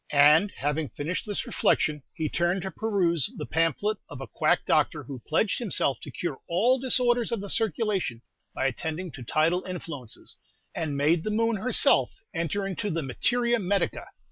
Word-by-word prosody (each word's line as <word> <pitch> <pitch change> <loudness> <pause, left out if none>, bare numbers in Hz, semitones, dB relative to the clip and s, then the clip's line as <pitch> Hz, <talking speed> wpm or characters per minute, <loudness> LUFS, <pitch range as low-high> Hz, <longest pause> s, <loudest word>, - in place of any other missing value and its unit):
And 150 +7 +6
having 145 +1 -1
finished 165 +8 -4
this 205 - -2
reflection, 150 -1 +1
he 160 -2 -3
turned 175 +4 0
to 190 - -4
peruse 180 - +1
the - - -4
pamphlet 165 +6 0
of - - -8
a 135 - -5
quack - - +1
doctor - - +2
who 135 -4 -8
pledged 195 +6 +1
himself 175 - 0
to - - -8
cure 160 -7 -4
all 230 +10 +3
disorders 245 -2 +2
of 230 - -1
the 200 0 -2
circulation 195 - 0 0.3
by - - -1
attending 160 +6 -3
to 130 - -10
tidal 160 +8 +1
influences, 165 -10 -7 0.4
and 150 -4 -2
made 160 +4 +2
the - - -2
moon 225 +1 +1
herself 250 +6 +3 0.2
enter 170 +4 -1
into 195 +2 -3
the 165 -2 -2
materia 240 - +1
medica. 200 0 -1
175 Hz, 170 wpm, -27 LUFS, 150-210 Hz, 0.4 s, And